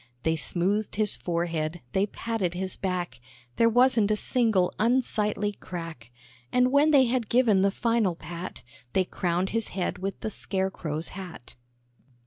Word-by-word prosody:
They 160 Hz, 0 st, +2 dB
smoothed 190 Hz, +6 st, -1 dB
his 210 Hz, -1 st, 0 dB
forehead, 170 Hz, -1 st, -2 dB
they 195 Hz, +2 st, +2 dB
patted 205 Hz, -5 st, -2 dB
his 185 Hz, 0 st, -2 dB
back, 180 Hz, -8 st, -3 dB, 0.4 s
There 230 Hz, -, +5 dB
wasn't 245 Hz, -3 st, +4 dB
a 215 Hz, -, +3 dB
single 215 Hz, -5 st, +2 dB
unsightly 210 Hz, -3 st, +1 dB
crack; 165 Hz, -, -8 dB, 0.4 s
And 250 Hz, 0 st, +3 dB
when 285 Hz, +3 st, +5 dB
they 280 Hz, -4 st, +6 dB
had 240 Hz, -2 st, -1 dB
given 235 Hz, -6 st, +4 dB
the 200 Hz, -, +4 dB
final 225 Hz, -3 st, +1 dB
pat, 170 Hz, +3 st, -7 dB, 0.3 s
They 190 Hz, -, +3 dB
crowned 180 Hz, +1 st, -1 dB
his 225 Hz, 0 st, -1 dB
head 180 Hz, -1 st, -1 dB
with 195 Hz, +1 st, -4 dB
the 220 Hz, -, -3 dB
scare 190 Hz, -1 st, -2 dB
crow's 155 Hz, -3 st, -4 dB
hat. 180 Hz, -10 st, -9 dB
195 Hz, 150 wpm, -27 LUFS, 175-230 Hz, 0.4 s, they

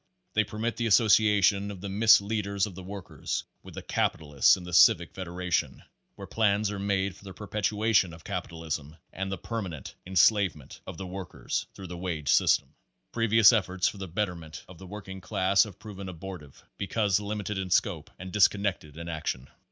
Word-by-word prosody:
They 110 Hz, -, +3 dB
permit 110 Hz, +3 st, -3 dB
the 120 Hz, -, 0 dB
association 105 Hz, -2 st, +4 dB
of 100 Hz, -2 st, -7 dB
the 100 Hz, -, -6 dB
misleaders 100 Hz, -1 st, +3 dB
of 105 Hz, -, -8 dB
the 95 Hz, -, -9 dB
workers 95 Hz, 0 st, -5 dB, 0.2 s
with -, -, -13 dB
the -, -, -7 dB
capitalists 75 Hz, -3 st, +2 dB
in 90 Hz, -, -9 dB
the 90 Hz, 0 st, -8 dB
Civic -, -, +5 dB
Federa 90 Hz, -1 st, -6 dB
tion, -, -, 0 dB, 0.3 s
where -, -, -8 dB
plans 105 Hz, -1 st, +1 dB
are 100 Hz, -, -5 dB
made 100 Hz, -1 st, 0 dB
for -, -, -18 dB
the 95 Hz, -2 st, -10 dB
perpetuation 105 Hz, -2 st, +1 dB
of 80 Hz, 0 st, -13 dB
capitalism, 80 Hz, -5 st, -5 dB, 0.2 s
and 95 Hz, 0 st, -4 dB
the 95 Hz, -, -3 dB
permanent 95 Hz, -, -6 dB
enslavement 95 Hz, -5 st, +2 dB
of -, -, -7 dB
the 95 Hz, -, -6 dB
work 95 Hz, 0 st, -7 dB
ers -, -, -3 dB
through 95 Hz, -, -9 dB
the 90 Hz, -1 st, -7 dB
wage 80 Hz, -5 st, -3 dB
system. -, -, +3 dB, 0.4 s
Previous 115 Hz, 0 st, +5 dB
efforts 95 Hz, -3 st, +1 dB
for 110 Hz, -2 st, -4 dB
the 95 Hz, -, -5 dB
betterment 85 Hz, -3 st, -4 dB
of 90 Hz, -2 st, -14 dB
the 95 Hz, -, -10 dB
working 95 Hz, -1 st, -8 dB
class 95 Hz, +2 st, +2 dB
have 100 Hz, -4 st, -11 dB
proven 100 Hz, -3 st, -8 dB
abortive 85 Hz, -5 st, -9 dB, 0.2 s
because 100 Hz, -1 st, +1 dB
limited 105 Hz, -1 st, -4 dB
in 95 Hz, -1 st, -4 dB
scope -, -, +1 dB
and 95 Hz, +1 st, -8 dB
disconnected 100 Hz, -7 st, +1 dB
in 85 Hz, 0 st, -7 dB
action. 80 Hz, -5 st, -4 dB
95 Hz, 180 wpm, -28 LUFS, 90-105 Hz, 0.4 s, Civic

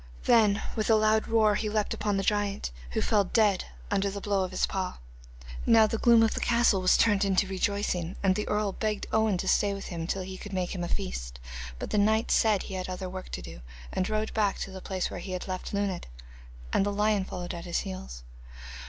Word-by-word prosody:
Then 215 Hz, -3 st, +4 dB
with 215 Hz, -1 st, -1 dB
a 225 Hz, -, +6 dB
loud 215 Hz, 0 st, +3 dB
roar 220 Hz, -2 st, +4 dB
he 210 Hz, +1 st, -1 dB
leaped 210 Hz, -1 st, 0 dB
upon 205 Hz, -1 st, -1 dB
the 195 Hz, -, 0 dB
giant, 205 Hz, -, 0 dB, 0.2 s
who -, -, 0 dB
fell 210 Hz, -2 st, +3 dB
dead 205 Hz, -1 st, +2 dB, 0.3 s
under 200 Hz, +1 st, +1 dB
the 200 Hz, +1 st, -5 dB
blow 200 Hz, -1 st, 0 dB
of 185 Hz, -, -3 dB
his 185 Hz, -, +1 dB
paw. 190 Hz, -1 st, -3 dB, 0.7 s
Now 225 Hz, -1 st, +6 dB
the 220 Hz, +1 st, -2 dB
gloom 235 Hz, -1 st, +6 dB
of 220 Hz, -, +2 dB
the -, -, -2 dB
castle 235 Hz, -5 st, +3 dB
was 185 Hz, -, +4 dB
turned 205 Hz, -3 st, +3 dB
into 195 Hz, 0 st, +2 dB
rejoicing, 190 Hz, -2 st, -1 dB
and 190 Hz, -1 st, +4 dB
the 210 Hz, +2 st, -3 dB
earl 210 Hz, -1 st, 0 dB
begged 215 Hz, +1 st, -2 dB
Owen 220 Hz, -3 st, +2 dB
to 190 Hz, -, -4 dB
stay 200 Hz, 0 st, +2 dB
with 195 Hz, -, -7 dB
him 165 Hz, -2 st, -4 dB
till 190 Hz, +1 st, -2 dB
he 185 Hz, 0 st, -7 dB
could 205 Hz, -, -8 dB
make 185 Hz, -1 st, -1 dB
him 180 Hz, -2 st, -4 dB
a -, -, -2 dB
feast, -, -, -4 dB, 0.4 s
but -, -, -6 dB
the 210 Hz, -, +2 dB
knight 220 Hz, +2 st, +2 dB
said 215 Hz, -3 st, +3 dB
he -, -, -8 dB
had 185 Hz, -1 st, -4 dB
other 185 Hz, 0 st, -4 dB
work 185 Hz, 0 st, -7 dB
to -, -, -6 dB
do, -, -, -9 dB, 0.3 s
and 185 Hz, -, -1 dB
rode 215 Hz, 0 st, -1 dB
back 210 Hz, -3 st, +1 dB
to 195 Hz, -, -4 dB
the 190 Hz, 0 st, -8 dB
place 185 Hz, -1 st, -3 dB
where -, -, -5 dB
he 185 Hz, +1 st, -6 dB
had 185 Hz, -, -4 dB
left 185 Hz, -1 st, -4 dB
Luned, 200 Hz, -3 st, -2 dB, 0.7 s
and -, -, +3 dB
the 205 Hz, -, 0 dB
lion 210 Hz, 0 st, +2 dB
followed 180 Hz, -1 st, -5 dB
at 170 Hz, 0 st, -7 dB
his 175 Hz, -, -1 dB
heels. 65 Hz, -9 st, -7 dB
200 Hz, 230 wpm, -28 LUFS, 185-215 Hz, 0.7 s, a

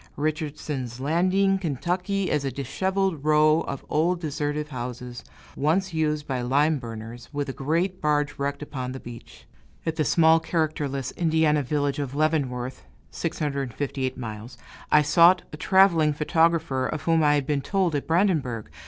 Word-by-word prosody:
Richardson's 145 Hz, -5 st, -3 dB
Landing, 185 Hz, +7 st, +2 dB
Ky., 180 Hz, +5 st, -1 dB
is 150 Hz, -, +1 dB
a 135 Hz, -, -2 dB
disheveled 185 Hz, +5 st, -1 dB
row 155 Hz, +1 st, +4 dB
of 140 Hz, -, -5 dB
old 170 Hz, +4 st, +1 dB
deserted 150 Hz, -1 st, -3 dB
houses, 125 Hz, -1 st, -6 dB, 0.3 s
once 175 Hz, +6 st, 0 dB
used 150 Hz, -2 st, 0 dB
by 130 Hz, -3 st, -2 dB
lime 145 Hz, +5 st, +2 dB
burners, 115 Hz, 0 st, -8 dB
with 145 Hz, -1 st, -3 dB
a -, -, -3 dB
great 170 Hz, +8 st, -1 dB
barge 150 Hz, -2 st, 0 dB
wrecked 140 Hz, +1 st, -2 dB
upon 130 Hz, -3 st, -5 dB
the 130 Hz, -, -6 dB
beach. 120 Hz, -2 st, -12 dB, 0.4 s
At 160 Hz, -1 st, -2 dB
the 155 Hz, -, +2 dB
small, 160 Hz, +1 st, +5 dB
characterless 150 Hz, -5 st, -2 dB
Indiana 160 Hz, -3 st, +2 dB
village 145 Hz, +1 st, -1 dB
of 140 Hz, -1 st, -4 dB
Leavenworth 135 Hz, -5 st, -1 dB, 0.3 s
(658 140 Hz, -, -3 dB
miles), 115 Hz, 0 st, -7 dB, 0.3 s
I 150 Hz, -, +6 dB
sought 175 Hz, +4 st, +5 dB
a -, -, -6 dB
traveling 170 Hz, -5 st, +4 dB
photographer, 155 Hz, -3 st, +1 dB
of 155 Hz, 0 st, -4 dB
whom 165 Hz, -1 st, +3 dB
I 150 Hz, 0 st, +4 dB
had 145 Hz, -2 st, 0 dB
been 145 Hz, -1 st, 0 dB
told 185 Hz, +2 st, 0 dB
at 145 Hz, -, -2 dB
Brandenburg. 155 Hz, -, 0 dB
150 Hz, 150 wpm, -25 LUFS, 135-165 Hz, 0.4 s, I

